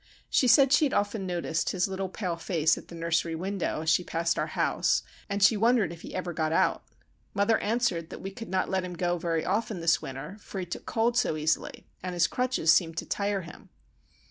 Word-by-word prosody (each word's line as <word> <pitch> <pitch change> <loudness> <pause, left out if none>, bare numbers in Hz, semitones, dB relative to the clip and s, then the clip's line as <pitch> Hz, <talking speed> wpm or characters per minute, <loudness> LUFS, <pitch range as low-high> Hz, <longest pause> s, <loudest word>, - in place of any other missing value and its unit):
She 255 - +3
said 270 +3 +6
she 305 - +5
had 275 - -1
often 205 -1 -1
noticed 170 -2 -1
his 180 -1 +1
little 190 0 -3
pale 180 -3 -3
face 165 -2 +1
at - - -11
the 170 - -10
nursery 165 0 0
window 185 -2 -2
as 160 0 +1
she 180 - +3
passed 165 0 -1
our - - 0
house, - - +2 0.3
and 200 0 0
she 220 - +6
wondered 220 -5 +2
if 170 - -12
he - - -9
ever 180 -1 -3
got 155 -1 -1
out. - - +2 0.5
Mother 205 +3 +3
answered 205 -7 0
that - - -8
we 195 - -6
could 225 +3 -9
not 185 0 0
let 190 -1 0
him 180 -1 -6
go 175 0 0
very 165 -1 -1
often 210 0 -1
this 165 0 +2
winter, 135 +9 -7
for 200 - -7
he 185 - -3
took 170 - -7
cold 235 +1 +1
so 230 - 0
easily, 155 +1 -1 0.2
and 180 -1 -4
his 170 -1 +4
crutches 250 -6 +2
seemed 165 0 +1
to - - -2
tire 200 -1 -1
him. 165 -2 -12
180 Hz, 220 wpm, -28 LUFS, 165-205 Hz, 0.5 s, said